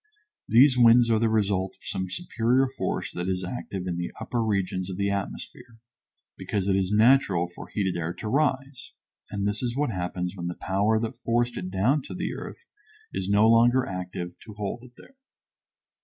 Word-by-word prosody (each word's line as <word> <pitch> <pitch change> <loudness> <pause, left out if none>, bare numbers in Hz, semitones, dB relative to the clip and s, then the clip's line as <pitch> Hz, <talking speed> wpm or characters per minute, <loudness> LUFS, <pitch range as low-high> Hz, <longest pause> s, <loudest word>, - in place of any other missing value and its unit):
These 125 +2 +6
winds 120 0 +6
are 110 - +3
the 115 0 +2
result 100 -3 0
of - - -29
some 95 -1 -3
superior 125 - +1
force 130 - -3
that 90 +1 -3
is 95 0 -1
active 95 -2 -5
in 90 -2 -3
the 85 0 -3
upper 115 +1 -2
regions 95 -3 -1
of 90 - -5
the 100 0 0
atmosphere, 100 +3 -6 0.6
because 100 -2 -2
it 95 - +3
is 95 0 0
natural 105 -5 +4
for 90 - -11
heated 95 -3 -1
air 85 -1 -2
to 110 - -6
rise, 135 0 -1 0.4
and 100 -1 -2
this 105 0 -1
is 125 0 -2
what 145 -4 +1
happens 90 0 -3
when 85 -2 -5
the 85 - -4
power 100 +4 +1
that 115 +2 -5
forced 120 +1 +1
it 90 - -4
down 110 +11 +2
to - - -8
the - - -3
earth 470 - -9 0.5
is 95 - -3
no 105 +2 +5
longer 120 +3 +5
active 90 -1 -5
to 105 - -12
hold 105 +3 -4
it 125 -1 -15
there. - - -16
105 Hz, 190 wpm, -26 LUFS, 95-120 Hz, 0.6 s, These